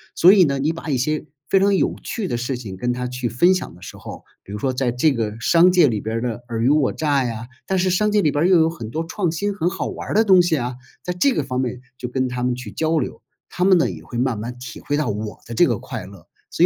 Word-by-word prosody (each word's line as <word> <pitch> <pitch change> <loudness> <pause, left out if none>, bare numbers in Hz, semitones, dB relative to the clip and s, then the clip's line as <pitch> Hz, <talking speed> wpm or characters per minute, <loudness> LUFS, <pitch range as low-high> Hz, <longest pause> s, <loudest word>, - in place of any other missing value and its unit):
所 180 +3 +7
以 195 -3 +6
呢， 140 -4 0
你 150 +4 0
把 165 -1 -7
一 135 - +1
些 155 +5 -1 0.2
非 195 - +3
常 200 0 +3
有 - - +1
趣 220 -4 -3
的 120 - -2
事 125 +2 -2
情， 105 -6 -7
跟 120 +6 -1
他 125 0 -3
去 125 -1 -3
分 170 - +4
享 185 - -5
的 90 - -17
时 95 - -9
候， - - -10 0.2
比 - - -12
如 105 - -5
说 130 +3 -1
在 125 -1 0
这 130 +5 +2
个 110 -2 -3
商 170 +8 +5
界 175 -4 +5
里 110 -5 -1
边 110 +1 -3
儿 - - -2
的 120 -1 -4
尔 115 -1 -2
虞 120 - +2
我 145 -2 +3
诈 145 -3 +1
呀 115 -1 -4 0.2
但 190 -1 0
是 185 +1 +2
商 210 +4 +2
界 210 0 +3
里 150 - +2
边 145 - +1
儿， - - +4
又 180 -3 +6
有 160 0 +4
很 120 -10 -7
多 160 +4 -2
创 180 0 -1
新、 200 +5 -2
很 175 -3 0
好 190 - -3
玩 - - -7
儿 - - -1
的 220 +2 +4
东 190 -3 +7
西 175 -2 +1
啊。 125 -1 -3 0.3
在 180 - -2
这 225 +11 +2
个 - - 0
方 130 -1 -2
面 125 -1 -3 0.2
就 125 - -5
跟 130 +1 0
他 125 0 -4
们 125 0 +1
去 125 0 -7
交 160 0 +1
流， 130 - -5 0.3
他 180 - -2
们 190 0 +6
呢 165 - +2
也 - - -8
会 120 - -7
慢 125 -2 0
慢 120 +4 -6
体 125 -2 -9
会 145 - -1
到 150 - 0
我 105 +1 -4
的 120 - -7
这 110 - +5
个 - - 0
快 - - -7
乐， - - -14 0.2
所 - - +3
135 Hz, 320 characters per minute, -21 LUFS, 120-175 Hz, 0.3 s, 所